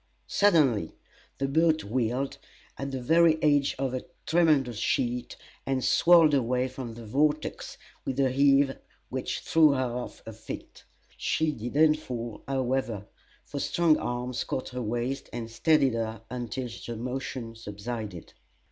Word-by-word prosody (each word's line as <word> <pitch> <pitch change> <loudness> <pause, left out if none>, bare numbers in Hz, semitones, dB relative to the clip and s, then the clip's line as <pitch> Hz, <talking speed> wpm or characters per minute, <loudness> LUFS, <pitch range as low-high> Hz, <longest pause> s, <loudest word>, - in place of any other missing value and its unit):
Suddenly 145 - +3 0.4
the 135 - -1
boat 160 +2 +2
wheeled, 130 +5 -1 0.4
at 135 0 -4
the 135 -1 -4
very 165 +3 +5
edge 145 -2 +3
of 135 -1 -1
the 130 0 -3 0.2
tremendous 150 -9 +3
sheet, 120 +1 -1 0.3
and 135 -1 -1
swirled 165 -3 +6
away 125 -1 +1
from 125 -3 -7
the 115 -1 -9
vortex 150 +7 -1 0.3
with 135 +1 -3
a 135 -2 +3
heave 140 0 +4 0.3
which - - -3
threw 155 -3 +5
her 130 -3 -1
off 125 - -6
her 115 - -7
feet. 110 +1 -9 0.3
She 160 -1 +1
did 120 -1 -6
not 155 0 +5
fall, 120 -7 -6
however; 130 -6 -1 0.4
for 140 - -5
strong 165 +1 +3
arms 125 0 -3
caught 130 - -4
her 125 0 -5
waist 120 +4 -3
and 115 -1 -5
steadied 140 0 +3
her 115 -1 -3
until 125 +1 -4 0.2
the 120 - -5
motion 125 0 -4
subsided. 105 -3 -7
130 Hz, 145 wpm, -28 LUFS, 120-145 Hz, 0.4 s, swirled